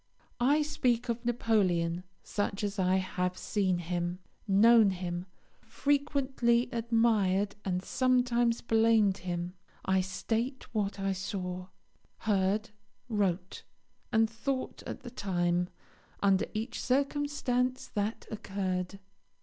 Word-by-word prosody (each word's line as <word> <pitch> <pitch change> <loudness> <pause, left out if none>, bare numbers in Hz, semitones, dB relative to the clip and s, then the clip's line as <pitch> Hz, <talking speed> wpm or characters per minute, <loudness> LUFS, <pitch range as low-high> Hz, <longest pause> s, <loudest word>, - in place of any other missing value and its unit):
I 285 +5 +4
speak 250 -5 0
of 235 +1 -1
Napoleon 185 -8 +1 0.2
such 205 -1 -2
as 205 0 -2
I 185 0 +3
have 185 -1 -1
seen 190 -4 0
him, 175 +1 -2 0.3
known 215 +2 +6
him, 180 -1 -4 0.3
frequently 270 -4 +1
admired 220 -4 +2
and 180 -1 -1
sometimes 245 -1 +2
blamed 225 -3 +3
him. 175 0 -3 0.3
I 190 0 +3
state 225 +8 -2
what 205 -2 -1
I 195 0 0
saw, 185 -1 -4 0.5
heard, 210 +1 +1 0.4
wrote, 190 -4 -1 0.5
and 225 0 +4
thought 255 +4 -3
at - - -6
the 245 - -9
time, 175 -5 0 0.5
under 195 -1 +3
each 225 +3 -3
circumstance 265 -2 0
that 210 0 -2
occurred. 190 -3 -3
210 Hz, 110 wpm, -31 LUFS, 185-235 Hz, 0.5 s, known